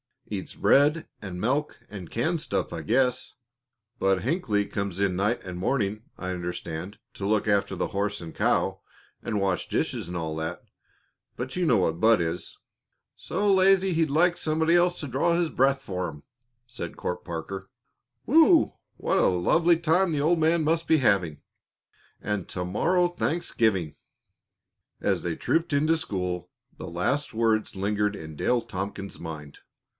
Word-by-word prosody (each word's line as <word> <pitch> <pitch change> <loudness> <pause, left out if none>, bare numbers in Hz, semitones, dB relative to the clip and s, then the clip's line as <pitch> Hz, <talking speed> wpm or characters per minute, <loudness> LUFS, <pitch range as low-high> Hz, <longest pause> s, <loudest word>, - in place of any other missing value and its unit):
"Eats - - -5
bread 150 +4 +4 0.2
and 90 -3 -6
milk 140 +6 -1
and 95 -5 -8
canned 160 +8 -1
stuff, 165 - -2
I - - -4
guess. 125 +1 +1 0.7
Bud 95 -3 +2
Hinckley 115 - 0
comes 100 -2 -4
in 95 -2 +1
night 105 +5 0
and 90 -1 -6
morning, 105 -1 -1
I 90 - -5
understand, 90 +1 -5 0.2
to 100 - -5
look 105 0 +1
after 100 -1 +1
the 90 - -1
horse 105 +1 -2
and 80 -1 -8
cow - - +1 0.4
and 105 -3 -2
wash 95 -2 0
dishes - - -2
and 90 - -6
all 80 -2 -3
that, 80 +2 -4 0.7
but 130 +6 -5
you 180 - +1
know 125 -8 +4
what 85 -3 0
Bud 110 -2 +5
is." 85 +1 -4 0.6
"So 200 +3 +1
lazy 190 0 +4
he'd 160 -1 +2
like 170 +4 +3
somebody 160 +1 +1
else 175 0 +3
to 145 - -4
draw 140 +7 +1
his 170 -1 +1
breath 135 0 +2
for 90 -5 -3
him!" 75 -3 -10 0.4
said 120 -8 -7
Court 90 0 -4
Parker, 95 +3 -6 0.6
promptly. 315 +7 +6
"Whew! 320 0 +5 0.2
What - - 0
a - - +4
lovely 165 - +3
time 170 +2 +2
the 145 - 0
old 165 +3 +3
man 160 +1 +3
must 165 +2 +1
be 160 - +5
having 95 - +1 0.8
and 105 -3 -2
to 90 - -3
morrow 175 - +2
Thanksgiving!" 110 - 0 1.0
As - - +1
they 85 -2 -2
trooped 165 - 0
into 155 +3 +3
school, 90 - -3 0.3
the - - -7
last 130 - -1
words 110 -2 +1
lingered 105 +1 0
in 80 -3 -9
Dale 125 +8 +1
Tompkins's 95 -1 -6
mind. 75 -3 -8
105 Hz, 160 wpm, -26 LUFS, -, 1.0 s, promptly